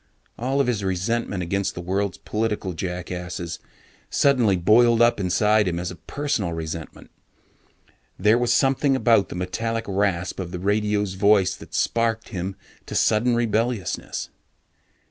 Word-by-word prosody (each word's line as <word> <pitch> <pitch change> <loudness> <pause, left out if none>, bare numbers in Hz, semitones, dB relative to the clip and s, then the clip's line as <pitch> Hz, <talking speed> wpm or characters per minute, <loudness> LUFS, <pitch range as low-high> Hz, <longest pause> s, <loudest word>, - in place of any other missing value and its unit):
All 130 +4 -1
of 140 - +3
his 115 -5 -1
resentment 95 +1 -1
against 100 +3 -1
the - - -5
world's 95 +2 -2
political 105 -4 -2
jackasses 90 0 -5 0.5
suddenly 125 -9 +3
boiled 115 +6 +4
up 120 -2 +4
inside 105 +3 +2
him 85 -1 -1
as 90 +1 -3
a - - -8
personal 105 - -2
resentment. 80 0 -7 1.1
There 105 +5 +4
was 120 -1 +1
something 135 +2 +3
about 115 -6 +3
the - - -6
metallic 115 +6 -2
rasp 95 -3 -1
of 90 -2 -4
the 90 - -5
radio's 105 +1 0
voice 95 -1 +3
that - - -10
sparked 115 0 0
him 95 -2 -4 0.3
to - - -6
sudden 115 +3 +3
rebelliousness. 115 -3 -1
105 Hz, 140 wpm, -23 LUFS, 90-115 Hz, 1.1 s, boiled